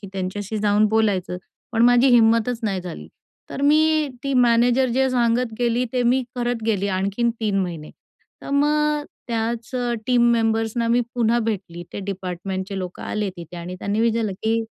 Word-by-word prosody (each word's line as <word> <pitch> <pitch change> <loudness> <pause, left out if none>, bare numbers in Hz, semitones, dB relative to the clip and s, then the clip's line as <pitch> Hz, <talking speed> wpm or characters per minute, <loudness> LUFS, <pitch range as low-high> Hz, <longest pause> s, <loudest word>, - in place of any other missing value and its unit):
की 200 - -9
त्यांच्याशी 195 +3 -4
जाऊन 210 0 +3
बोलायचं, 205 -5 0 0.4
पण 225 0 +2
माझी 245 +2 +5
हिंमतच 230 0 +4
नाही 195 -4 -1
झाली. 170 - -8 0.4
तर 275 - -5
मी 310 +1 +3 0.2
ती 275 - -1
मॅनेजर 245 +1 +4
जे 265 +1 +2
सांगत 240 -1 +1
गेली 240 0 +1
ते 250 - +1
मी 250 +2 +2
करत 240 -2 -2
गेली 200 -3 0
आणखीन 200 +5 0
3 205 -3 0
महिने 170 -5 -4 0.5
तर - - -7
मग 280 +1 +3 0.3
अ, 290 - -9 0.2
त्याच 230 +1 -2 0.4
टीम 240 -1 +4
मेंबर्सना 225 0 0
मी 240 +1 +3
पुन्हा 235 -1 +2
भेटली. 195 -7 -3
ते - - -5
डिपार्टमेंटचे 190 0 -4
लोक 180 -1 -6
आले 210 -2 -2
तिथे 170 0 -9
आणि 175 +1 -6
त्यांनी 205 +3 -1
विचारलं, 225 -3 +1
की 225 +1 +1
225 Hz, 165 wpm, -22 LUFS, 195-240 Hz, 0.5 s, माझी